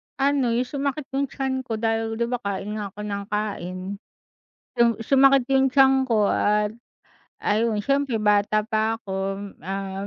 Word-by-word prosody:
Ano, 270 -4 +1
yung 245 +2 +1
sumakit 280 +2 -3
yung 275 +1 0
tiyan 265 -1 -2
ko 225 - -2
dahil, 225 0 -1
'di 235 +1 0
ba, 245 - -1
kain 200 -1 -4
nga 205 - -3
ako 210 +2 -9
ng 200 -1 -3
kain. 205 -4 -3 1.0
Yung 235 0 +6
sumakit 275 +1 +5
yung 270 0 +4
tiyan 265 0 +4
ko 215 -5 +2
at 210 0 +2 0.7
ayun 220 +1 +1
siyempre 275 0 +1
bata 210 0 +3
pa 220 0 0
akom, 195 0 -4
um, 195 +2 -5
225 Hz, 155 wpm, -24 LUFS, 205-265 Hz, 1.0 s, Yung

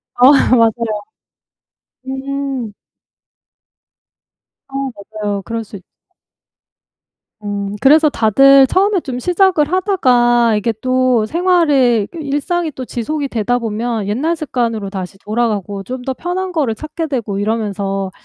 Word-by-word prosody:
어 250 +2 +7 0.3
맞아요. 225 -2 +1 1.1
음. 270 -4 -4 2.0
어 270 - -16 0.2
맞아요. 205 -1 -5
그럴 230 +2 -4
수 205 - -11
있 185 - -12 1.6
음 205 -1 -4
그래서 305 +2 +5
다들 270 +5 +5
처음에 390 +6 +2
좀 260 -6 -5
시작을 355 0 +2
하다가 240 - +3
이게 220 +2 -1
또 255 -3 +2
생활의 290 - +2
그 340 - -11
일상이 310 +4 -2
또 260 - -6
지속이 280 +5 -3
되다 245 +1 0
보면 225 -1 -3
옛날 310 +11 0
습관으로 230 -9 -2
다시 190 -1 -6
돌아가고 210 -3 -2
좀 255 +5 -6
더 265 - 0
편한 360 +6 -3
거를 280 -10 0
찾게 310 +5 -5
되고 225 -8 -3
이러면서 200 -2 -2
245 Hz, 240 characters per minute, -16 LUFS, 215-290 Hz, 2.0 s, 어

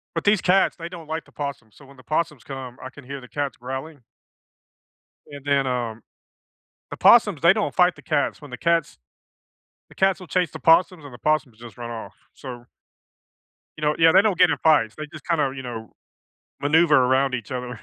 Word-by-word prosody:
But - - -2
these 205 -2 +4
cats, 190 +2 +3
they 170 -1 -7
don't 170 -3 -11
like 160 0 -4
the - - -23
possums, 140 -7 -6
so 140 - -16
when 140 0 -17
the 130 - -16
possums 155 -1 -2
come, 130 -3 -8
I 130 - -7
can 140 -1 -14
hear 140 +1 -7
the 125 - -14
cats 145 -2 -3
growling 130 +3 -7 1.3
and 145 -1 -10
then, 140 -2 +1
um 120 -3 -3 0.9
the - - -6
possums, 205 -9 +5
they 170 +3 +6
don't 215 -1 -2
fight 180 -1 +4
the - - -15
cats. 150 -1 -1
When 145 - -11
the 125 - -7
cats 170 -2 0 0.9
the - - -18
cats 190 0 +1
will 180 - -10
chase 180 -3 0
the - - -8
possums 165 -1 +3
and 130 - -12
the - - -11
possums 140 -7 -1
just 120 +1 -13
run 120 0 -6
off, 115 -1 -7 0.2
so 120 -3 -10 1.1
you 155 - -11
know 150 0 +2
yeah, 165 0 +6
they 195 - +6
don't 200 -5 0
get - - +6
in - - +1
fights, 150 -8 +3
they 155 0 -6
just 155 - -11
kinda, 150 -6 +1
you 130 - -6
know, 115 -3 -8 0.7
maneuver 155 +1 +4
around 130 +1 +3
each 120 0 -8
other. 125 -3 -5
145 Hz, 210 wpm, -23 LUFS, 125-165 Hz, 1.3 s, they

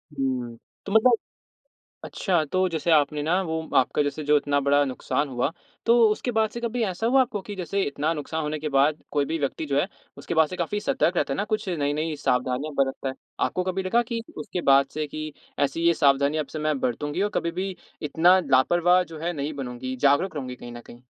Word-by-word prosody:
हुँ। 125 -4 -2 0.3
तो 195 - -5
मतलब 220 +4 +5 0.9
अच्छा, 175 -5 0
तो 185 +5 +1
जैसे 165 0 -1
आपने 150 -1 +3
ना, 170 +5 +2
वो 160 -2 -3
आपका, 130 +3 +3
जैसे 145 +2 -3
जो 150 +1 +4
इतना 145 0 +1
बड़ा 140 +1 +3
नुकसान 140 +2 -2
हुआ, 125 +2 -1 0.4
तो 235 +1 +6
उसके 215 +4 -1
बाद 220 -1 +2
से 235 - -6
कभी 235 0 -2
ऐसा 190 +2 -2
हुआ 265 +3 +4
आपको 240 -5 0
कि 205 - -7
जैसे 195 +2 -1
इतना 145 0 -1
नुकसान 160 +1 -4
होने 150 0 -2
के 155 +1 -3
बाद 145 +2 +2
कोई 145 -1 +2
भी 165 +3 -2
व्यक्ति 145 +2 -2
जो 140 -1 +1
है, 180 - -1 0.3
उसके - - -4
बाद 160 -1 +4
से 185 - -6
काफ़ी 180 +4 -2
सतर्क 215 -7 +1
रहता 145 -4 +1
है - - -2
ना, 205 - -1
कुछ 215 -1 -2
नई-नई 155 -1 -1
सावधानियाँ 130 +2 -1
बरतता 135 0 0
है। 130 - -4 0.3
आपको 185 - -2
कभी 185 +1 -1
लगा 230 +6 +2
कि 235 -1 -2 0.2
उसके 190 -5 -4
बाद 135 0 +6
से 155 0 -2
कि 155 +1 -6 0.3
ऐसी 145 +3 0
ये 170 - +5
सावधानियाँ 140 +1 +2
अब - - -25
से 155 - -5
मैं 155 -2 0
बरतूँगी 145 +8 -1
और 205 - 0
कभी 170 - 0
भी 190 -1 -3 0.3
इतना 170 +5 +4
लापरवाह 175 +7 +4
जो 165 -3 -10
है, 170 +2 -1
नहीं 145 -1 -3
बनूँगी, 130 -1 -5
जागरूक 145 +7 +2
रहूँगी 130 -3 -5
कहीं 120 -1 -10
न 120 - -8
कहीं।? 120 +1 -14
155 Hz, 220 wpm, -25 LUFS, 140-185 Hz, 0.9 s, तो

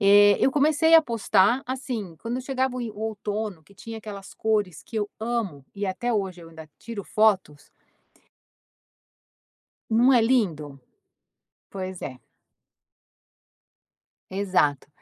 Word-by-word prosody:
eh, 205 0 +7
eu - - +4
comecei 310 +3 +4
a 325 - +9
postar 230 -1 +2
assim, 245 -9 -4
quando 230 +2 -4
eu - - -3
chegava 260 -1 -1
o - - -3
inv 225 -3 -5
o 210 - -10
outono, 210 -5 -4
que 200 - -21
tinha 225 +2 -8
aquelas 200 -2 -9
cores 210 -6 -1
que - - -15
eu 205 -1 -1
amo 220 - -3
e 200 0 -3
até 235 +6 -2
hoje 190 -4 -2
eu 165 - -12
ainda 160 -1 -12
tiro 230 -3 -7
fotos. 190 -9 +1 2.2
Não 235 +4 +5
é 240 - +5
lindo? 165 - 0 0.9
Pois 185 -2 -6
é. 130 -3 -6 2.1
Exato. 185 -9 +1
210 Hz, 130 wpm, -25 LUFS, 185-235 Hz, 2.2 s, a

